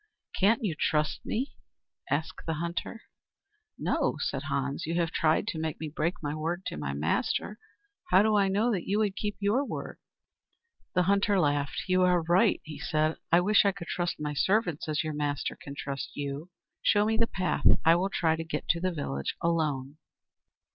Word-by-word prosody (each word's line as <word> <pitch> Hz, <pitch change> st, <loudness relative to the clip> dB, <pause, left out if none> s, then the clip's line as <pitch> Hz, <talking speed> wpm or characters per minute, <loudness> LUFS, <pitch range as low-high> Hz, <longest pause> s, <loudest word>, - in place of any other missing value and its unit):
"Can't 220 Hz, +4 st, +4 dB
you 195 Hz, -6 st, 0 dB
trust 150 Hz, 0 st, 0 dB
me?" 255 Hz, +5 st, -2 dB, 0.6 s
asked 155 Hz, +4 st, -2 dB
the 160 Hz, -, 0 dB
hunter. 170 Hz, +7 st, -4 dB, 0.7 s
"No," -, -, 0 dB
said -, -, -2 dB
Hans. 140 Hz, +1 st, -2 dB
"You 165 Hz, -, -1 dB
have 170 Hz, -2 st, +1 dB
tried 155 Hz, +4 st, +2 dB
to 165 Hz, -7 st, -3 dB
make 160 Hz, -1 st, -3 dB
me 155 Hz, -, -4 dB
break 165 Hz, +5 st, -1 dB
my 145 Hz, 0 st, -2 dB
word 165 Hz, +4 st, -3 dB
to -, -, -4 dB
my 75 Hz, -2 st, -3 dB
master. 75 Hz, -, -1 dB, 0.5 s
How 195 Hz, -, +6 dB
do 215 Hz, 0 st, +3 dB
I 200 Hz, -1 st, +4 dB
know 210 Hz, +5 st, +2 dB
that 190 Hz, -6 st, -2 dB
you 200 Hz, -, +1 dB
would 210 Hz, -3 st, +1 dB
keep 210 Hz, 0 st, -3 dB
your 210 Hz, +7 st, +2 dB
word?" -, -, -6 dB, 1.0 s
The 180 Hz, -, +4 dB
hunter 200 Hz, +1 st, +3 dB
laughed. 145 Hz, -3 st, 0 dB
"You 185 Hz, 0 st, +3 dB
are 180 Hz, -2 st, +4 dB
right," 180 Hz, +6 st, +3 dB
he 155 Hz, -1 st, -9 dB
said. 155 Hz, +1 st, 0 dB
"I 170 Hz, +1 st, +6 dB
wish 205 Hz, +3 st, +5 dB
I 200 Hz, -, +3 dB
could 185 Hz, -3 st, -9 dB
trust 175 Hz, -1 st, -1 dB
my 150 Hz, -1 st, -2 dB
servants 175 Hz, 0 st, +1 dB
as 155 Hz, 0 st, 0 dB
your 155 Hz, -1 st, -3 dB
master 145 Hz, -1 st, -2 dB
can 140 Hz, -, -9 dB
trust 140 Hz, -1 st, -5 dB
you. 145 Hz, +4 st, -4 dB, 0.3 s
Show 205 Hz, 0 st, +4 dB
me 220 Hz, +1 st, +1 dB
the 230 Hz, +1 st, +2 dB
path. 185 Hz, -7 st, 0 dB, 0.2 s
I 165 Hz, -, +8 dB
will 185 Hz, +3 st, +1 dB
try 160 Hz, -4 st, +1 dB
to 165 Hz, -, -4 dB
get 160 Hz, -, -4 dB
to 170 Hz, -, +3 dB
the 185 Hz, +1 st, 0 dB
village 70 Hz, -, -3 dB
alone." 155 Hz, -5 st, -1 dB
170 Hz, 190 wpm, -29 LUFS, 150-195 Hz, 1.0 s, I